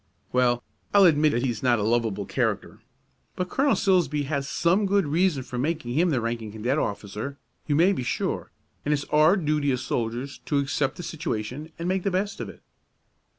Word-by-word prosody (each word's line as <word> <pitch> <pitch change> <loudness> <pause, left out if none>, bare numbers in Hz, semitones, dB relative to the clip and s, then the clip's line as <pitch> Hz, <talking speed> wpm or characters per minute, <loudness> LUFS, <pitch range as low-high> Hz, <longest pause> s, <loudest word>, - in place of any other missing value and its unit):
"Well, 120 -1 +2 0.3
I'll 200 - +8
admit 155 -2 +5
that 120 - 0
he's 120 -5 -2
not 125 -2 +3
a 105 - -1
lovable 110 -3 0
character; - - -2 0.6
but 180 0 -2
Colonel 275 +1 +3
Silsbee 170 -7 +2
had 140 -1 -2
some 180 +8 +2
good 200 -2 +2
reason 160 -2 +1
for 125 -1 -5
making 150 -3 -1
him 170 +6 +3
the 135 -6 +1
ranking 115 -2 -3
cadet 120 +7 -1
officer, 105 +6 -4 0.3
you 145 - +2
may 175 +6 +5
be 155 - -3
sure, 125 - -2 0.3
and 150 - +1
it's 145 - -4
our 155 +6 +5
duty 150 -4 +1
as 125 -1 -1
soldiers 120 +4 -3
to 145 - +1
accept 140 0 0
the 175 - -6
situation 150 -1 -4
and 170 - -3
make 190 +1 +1
the 195 - 0
best 200 +2 -2
of - - -4
it." - - -14
145 Hz, 195 wpm, -26 LUFS, 120-170 Hz, 0.6 s, I'll